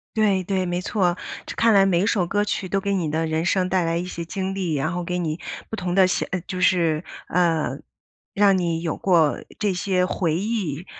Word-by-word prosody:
对 205 Hz, -4 st, +2 dB
对， 190 Hz, 0 st, -1 dB
没 175 Hz, 0 st, -2 dB
错。 180 Hz, -2 st, +1 dB, 0.3 s
这 -, -, -7 dB
看 230 Hz, -1 st, +4 dB
来 195 Hz, -1 st, +6 dB
每 180 Hz, -3 st, +2 dB
一 -, -, +2 dB
首 200 Hz, -5 st, +1 dB
歌 205 Hz, +3 st, +1 dB
曲 205 Hz, -2 st, -2 dB
都 195 Hz, +2 st, 0 dB
给 200 Hz, +1 st, -1 dB
你 175 Hz, -5 st, 0 dB
的 160 Hz, +2 st, 0 dB
人 160 Hz, +1 st, -1 dB
生 185 Hz, 0 st, +1 dB
带 185 Hz, -2 st, +1 dB
来 165 Hz, 0 st, 0 dB
一 175 Hz, -, -2 dB
些 170 Hz, -2 st, -6 dB
经 190 Hz, +3 st, -3 dB
历， 180 Hz, -5 st, -1 dB
然 145 Hz, +4 st, -1 dB
后 175 Hz, -1 st, -3 dB
给 180 Hz, +1 st, -2 dB
你 165 Hz, -2 st, -2 dB, 0.3 s
不 220 Hz, -, -5 dB
同 180 Hz, -2 st, -2 dB
的 190 Hz, -1 st, +6 dB
写 185 Hz, -, 0 dB, 0.2 s
就 185 Hz, -2 st, -4 dB
是 170 Hz, -4 st, +2 dB, 0.3 s
呃， 170 Hz, -3 st, +1 dB, 0.6 s
让 200 Hz, -1 st, +4 dB
你 170 Hz, -2 st, -1 dB
有 165 Hz, -2 st, -2 dB
过 165 Hz, -6 st, +3 dB, 0.2 s
这 210 Hz, -2 st, 0 dB
些 180 Hz, 0 st, +1 dB
回 170 Hz, -3 st, -1 dB
忆， 185 Hz, -5 st, -2 dB
180 Hz, 235 characters per minute, -23 LUFS, 170-195 Hz, 0.6 s, 来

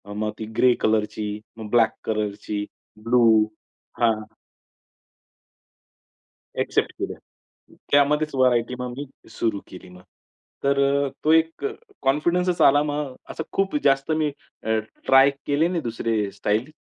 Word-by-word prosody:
मग 105 Hz, 0 st, -1 dB
ती 110 Hz, -, -4 dB
ग्रे 125 Hz, -1 st, +5 dB
कलरची, 105 Hz, -1 st, 0 dB, 0.2 s
मग 110 Hz, -1 st, -7 dB
ब्लॅक 115 Hz, -2 st, +4 dB
कलरची, 105 Hz, -1 st, -2 dB, 0.4 s
ब्लू. 120 Hz, 0 st, +4 dB, 0.8 s
हां. 115 Hz, -1 st, +5 dB, 2.4 s
अ‍ॅक्सेप्ट -, -, 0 dB
केलं. -, -, -4 dB, 0.7 s
त्यामध्येच 150 Hz, +1 st, +3 dB
व्हरायटी 125 Hz, -2 st, +2 dB
मग 125 Hz, -1 st, -4 dB
मी 145 Hz, -, -4 dB, 0.3 s
सुरू 105 Hz, -4 st, -1 dB
केली 90 Hz, -, -12 dB
मग. 90 Hz, 0 st, -14 dB, 0.6 s
तर 140 Hz, 0 st, +2 dB
अ, 140 Hz, 0 st, +2 dB, 0.2 s
तो 155 Hz, -, +4 dB
एक 160 Hz, -, +2 dB
अ, 420 Hz, -, 0 dB, 0.3 s
कॉन्फिडन्सच 170 Hz, +6 st, +1 dB
आला 145 Hz, +1 st, +6 dB
मग. 145 Hz, -2 st, -3 dB, 0.2 s
असं -, -, -4 dB
खूप 195 Hz, +8 st, 0 dB
जास्त 135 Hz, +3 st, +2 dB
मी 155 Hz, -1 st, +1 dB, 0.3 s
अ, 110 Hz, 0 st, +1 dB, 0.3 s
ट्राय 135 Hz, +1 st, +7 dB, 0.2 s
केले 150 Hz, +4 st, +2 dB
नाही 180 Hz, -2 st, -1 dB
दुसरे 115 Hz, -3 st, -1 dB
स्टाईल. 110 Hz, +8 st, -1 dB
130 Hz, 130 wpm, -23 LUFS, 110-150 Hz, 2.4 s, ट्राय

